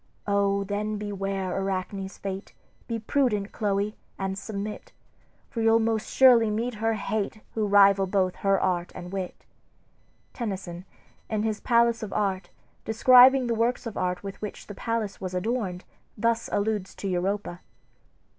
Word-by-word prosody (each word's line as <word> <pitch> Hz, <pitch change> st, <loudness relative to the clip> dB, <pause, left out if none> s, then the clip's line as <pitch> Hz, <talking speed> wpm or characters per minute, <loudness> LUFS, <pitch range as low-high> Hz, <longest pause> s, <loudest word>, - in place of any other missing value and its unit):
"O, 200 Hz, -1 st, +2 dB
then 210 Hz, +2 st, -2 dB
beware 195 Hz, -2 st, -3 dB
Arachne's 195 Hz, 0 st, -3 dB
fate; 195 Hz, 0 st, -6 dB, 0.3 s
Be 230 Hz, -, -2 dB
prudent, 225 Hz, -3 st, 0 dB
Chloe, 205 Hz, 0 st, -1 dB, 0.2 s
and 190 Hz, 0 st, -2 dB
submit, 205 Hz, +1 st, -6 dB, 0.6 s
For 230 Hz, -, -3 dB
you'll 225 Hz, 0 st, +5 dB
most 225 Hz, -1 st, 0 dB
surely 245 Hz, -4 st, +6 dB
meet 230 Hz, +4 st, -1 dB
her 225 Hz, 0 st, +2 dB
hate, 215 Hz, +1 st, -3 dB
Who 215 Hz, -2 st, 0 dB
rival 200 Hz, -1 st, +5 dB
both 185 Hz, -1 st, 0 dB
her 195 Hz, -1 st, +2 dB
art 175 Hz, -2 st, 0 dB
and 175 Hz, 0 st, -8 dB
wit." 190 Hz, -2 st, -5 dB, 0.9 s
Tennyson, 190 Hz, -6 st, -5 dB, 0.4 s
in 215 Hz, -1 st, -1 dB
his 220 Hz, -1 st, -1 dB
"Palace 235 Hz, 0 st, +3 dB
of 215 Hz, -3 st, -5 dB
Art," 195 Hz, -2 st, -1 dB, 0.3 s
describing 255 Hz, +3 st, +6 dB
the 235 Hz, -, 0 dB
works 235 Hz, +3 st, 0 dB
of 230 Hz, -, -5 dB
art 180 Hz, 0 st, -2 dB
with 195 Hz, -1 st, -7 dB
which 210 Hz, -, -6 dB
the 205 Hz, -, -8 dB
palace 220 Hz, -1 st, -3 dB
was 185 Hz, -1 st, -4 dB
adorned, 190 Hz, -2 st, -2 dB, 0.3 s
thus 230 Hz, +1 st, 0 dB
alludes 205 Hz, -2 st, -1 dB
to 200 Hz, -, -5 dB
Europa 185 Hz, 0 st, -2 dB
205 Hz, 145 wpm, -26 LUFS, 195-225 Hz, 0.9 s, surely